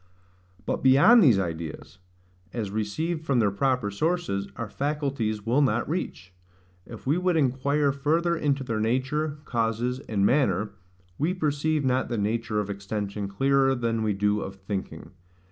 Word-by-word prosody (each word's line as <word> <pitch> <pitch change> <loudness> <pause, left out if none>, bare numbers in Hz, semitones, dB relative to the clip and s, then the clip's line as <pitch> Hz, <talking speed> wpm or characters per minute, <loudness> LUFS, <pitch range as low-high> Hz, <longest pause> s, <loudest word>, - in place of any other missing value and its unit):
But - - -2
beyond 140 - +7
these 125 - +6
ideas, 85 0 -5 0.5
as 110 -5 -3
received 155 +11 -2
from 140 -5 +1
their 105 -4 +3
proper 125 0 0
sources, 155 - -1
our 115 - -4
faculties 135 -5 -2
will 125 +6 +3
not 120 -4 +1
reach. 130 - -4 0.5
If 115 - -10
we 150 +6 +2
would 180 -2 +1
inquire 140 +1 +2
further 160 +5 +1
into 140 -4 0
their 115 -4 -2
nature, 140 +7 0
causes, 120 +2 -1
and 100 -3 +1
manner, 105 -6 +2 0.5
we 170 +5 +1
perceive 155 -2 0
not 130 0 +1
the 120 - -2
nature 110 +1 -1
of 105 - -2
extension 100 0 -4
clearer 135 +6 +2
than 115 -2 -1
we 110 -1 +1
do 105 +1 +1
of 95 - -6
thinking. 95 0 -6
125 Hz, 150 wpm, -26 LUFS, 105-145 Hz, 0.5 s, beyond